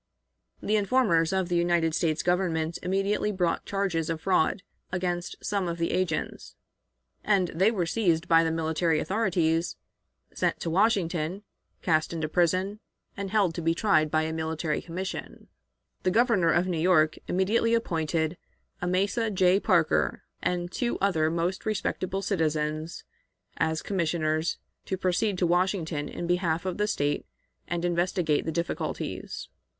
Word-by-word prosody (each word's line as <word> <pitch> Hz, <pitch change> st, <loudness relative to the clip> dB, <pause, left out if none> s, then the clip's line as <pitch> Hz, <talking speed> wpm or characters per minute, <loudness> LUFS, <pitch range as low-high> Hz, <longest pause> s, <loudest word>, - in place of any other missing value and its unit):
The 215 Hz, +1 st, +2 dB
informers 200 Hz, -7 st, +2 dB
of 190 Hz, -2 st, 0 dB
the 175 Hz, -, -1 dB
United 170 Hz, -2 st, +2 dB
States 160 Hz, -1 st, 0 dB
Government 170 Hz, -3 st, 0 dB
immediately 195 Hz, +3 st, 0 dB
brought 180 Hz, -4 st, -1 dB
charges 190 Hz, -5 st, -1 dB
of 165 Hz, -1 st, -2 dB
fraud 185 Hz, 0 st, +1 dB, 0.3 s
against 180 Hz, -1 st, -2 dB
some 200 Hz, -3 st, 0 dB
of 170 Hz, 0 st, -3 dB
these 170 Hz, 0 st, -1 dB
agents, 180 Hz, -4 st, -2 dB, 0.7 s
and 195 Hz, -4 st, +2 dB
they 190 Hz, +6 st, +3 dB
were 195 Hz, -7 st, 0 dB
seized 170 Hz, -2 st, +1 dB
by 165 Hz, 0 st, +5 dB
the 165 Hz, -, +1 dB
military 160 Hz, 0 st, +1 dB
authorities, 175 Hz, -5 st, 0 dB, 0.6 s
sent -, -, 0 dB
to 165 Hz, -, -2 dB
Washington, 180 Hz, -2 st, +1 dB, 0.4 s
cast 160 Hz, -1 st, +1 dB
into 160 Hz, -2 st, -2 dB
prison, 185 Hz, +5 st, +1 dB, 0.4 s
and 200 Hz, -1 st, -4 dB
held 200 Hz, -4 st, +2 dB
to 170 Hz, -, -4 dB
be 165 Hz, 0 st, +1 dB
tried 160 Hz, -7 st, +3 dB
by 155 Hz, +1 st, +2 dB
a 160 Hz, 0 st, -2 dB
military 160 Hz, -1 st, -2 dB
commission. 185 Hz, +3 st, -6 dB, 0.5 s
The -, -, +1 dB
Governor 205 Hz, -5 st, +3 dB
of 175 Hz, -, +3 dB
New 175 Hz, -3 st, -1 dB
York 155 Hz, -3 st, +3 dB
immediately 225 Hz, +5 st, +2 dB
appointed 165 Hz, -5 st, -1 dB, 0.4 s
Amasa 195 Hz, +6 st, +1 dB
J. 185 Hz, -1 st, +3 dB
Parker -, -, +2 dB, 0.2 s
and 175 Hz, 0 st, -1 dB
two 240 Hz, +3 st, -1 dB
other 160 Hz, -6 st, +2 dB
most 170 Hz, +3 st, -1 dB
respectable 195 Hz, -2 st, -2 dB
citizens 155 Hz, -3 st, -1 dB, 0.5 s
as 160 Hz, 0 st, 0 dB
commissioners, 160 Hz, -3 st, 0 dB, 0.3 s
to 190 Hz, -, -2 dB
proceed 185 Hz, +2 st, 0 dB
to 180 Hz, -, +2 dB
Washington 175 Hz, -4 st, 0 dB
in 175 Hz, -, -5 dB
behalf 175 Hz, -1 st, 0 dB
of 185 Hz, +1 st, -3 dB
the 210 Hz, -, +2 dB
State 145 Hz, -8 st, -1 dB, 0.4 s
and 175 Hz, 0 st, -2 dB
investigate 175 Hz, -2 st, +1 dB
the 160 Hz, -, -1 dB
difficulties. 170 Hz, +2 st, -4 dB
175 Hz, 145 wpm, -27 LUFS, 160-190 Hz, 0.7 s, by